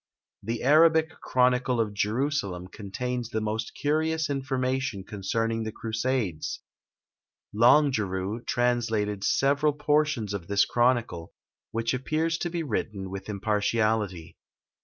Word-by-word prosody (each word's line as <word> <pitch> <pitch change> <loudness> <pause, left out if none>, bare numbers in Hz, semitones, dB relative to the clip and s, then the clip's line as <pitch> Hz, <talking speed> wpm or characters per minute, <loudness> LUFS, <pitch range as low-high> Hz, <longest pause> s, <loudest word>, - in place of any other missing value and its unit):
The 115 +3 -4
Arabic 160 +3 +5
chronicle 125 -1 +2
of 110 -2 0
Jerusalem 105 -4 -1
contains 120 +4 -4
the 110 - -1
most 110 +1 -3
curious 155 +1 0
information 130 -5 -1
concerning 115 +3 -2
the 110 0 -3
crusades: 110 -6 -2 0.9
Longuerue 110 -4 +3
translated 115 -5 0
several 145 +5 +2
portions 150 -7 +1
of 90 -5 -5
this 100 0 +3
chronicle, 120 -9 0 0.4
which 115 +1 -1
appears 155 +6 -1
to 175 - -2
be 170 -1 -3
written 100 -9 -3
with 95 +1 -7
impartiality. 105 -3 -1
115 Hz, 110 wpm, -27 LUFS, 105-135 Hz, 0.9 s, Arabic